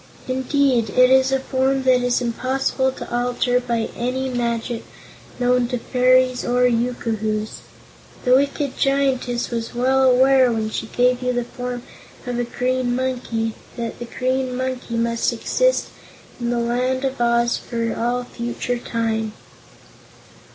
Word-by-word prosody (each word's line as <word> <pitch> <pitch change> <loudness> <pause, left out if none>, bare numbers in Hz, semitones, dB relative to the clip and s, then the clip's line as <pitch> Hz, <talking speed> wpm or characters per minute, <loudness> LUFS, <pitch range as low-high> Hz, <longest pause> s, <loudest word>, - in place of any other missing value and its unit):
Indeed, 260 -3 +1
it 255 +4 +5
is 265 0 +5
a 270 - +2
form 265 0 0
that 255 -1 +4
is 245 0 +1
impossible 260 +2 0
to 240 - -6
alter 245 0 +1
by 235 -2 -2
any 260 +2 -2
magic 235 -1 -2 0.6
known 250 0 +2
to 250 0 -2
fairies 255 +1 +2
or 245 +1 +1
yookoohoos. 225 -3 -1 0.7
The 250 - +4
wicked 280 0 0
Giantess 265 -3 +1
was 230 0 -4
well 260 +2 +2
aware, 260 0 +5
when 220 -1 -2
she 220 - -3
gave 250 +2 +2
you 250 0 0
the 245 0 0
form 245 0 -6 0.4
of 245 -1 -2
a - - +1
Green 250 +1 -1
Monkey, 245 -3 -2 0.2
that 235 -1 -4
the 240 - -5
Green 255 +1 -1
Monkey 255 -2 -3
must 230 +1 +1
exist - - +1 0.5
in 240 -1 -2
the 240 - 0
Land 250 +3 0
of 265 -2 -3
Oz 235 0 +2
for 230 -1 -3
all 240 +2 -1
future 240 0 -4
time." 225 -2 -2
245 Hz, 145 wpm, -21 LUFS, 235-260 Hz, 0.7 s, it